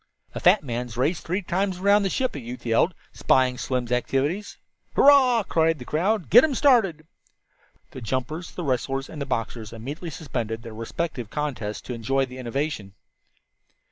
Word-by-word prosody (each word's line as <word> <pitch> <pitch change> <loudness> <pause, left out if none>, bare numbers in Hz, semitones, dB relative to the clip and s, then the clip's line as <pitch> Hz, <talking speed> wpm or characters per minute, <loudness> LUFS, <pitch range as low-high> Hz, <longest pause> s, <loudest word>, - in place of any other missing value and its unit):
"A - - -4
fat - - +5
man's 120 -2 -4
race 150 +7 +1
three 185 +4 -2
times 190 +1 -1
around 200 +2 +4
the 195 - 0
ship!" 255 +6 -1
a 145 - -5
youth 125 0 -8
yelled, 120 +10 +2 0.2
spying 130 -1 +2
Slim's 125 -2 -2
activities. 140 +10 -1 0.4
"Hurrah!" 260 -5 +6
cried 165 -3 +2
the 125 - -9
crowd. 185 - 0
"Get 240 - +10
them 295 -2 +1
started." 220 - +3 0.9
The 130 - -9
jumpers, 130 - -3
the 180 - -6
wrestlers, 135 0 -1
and 150 - -7
the 140 - -3
boxers 115 -3 -3
immediately 140 +9 -6
suspended 115 -7 -4
their 115 -2 -8
respective 115 +2 -4
contests 125 -8 -3
to 125 - -6
enjoy 135 +4 0
the 130 0 -10
innovation. 125 -5 -3
140 Hz, 165 wpm, -25 LUFS, 125-180 Hz, 0.9 s, Get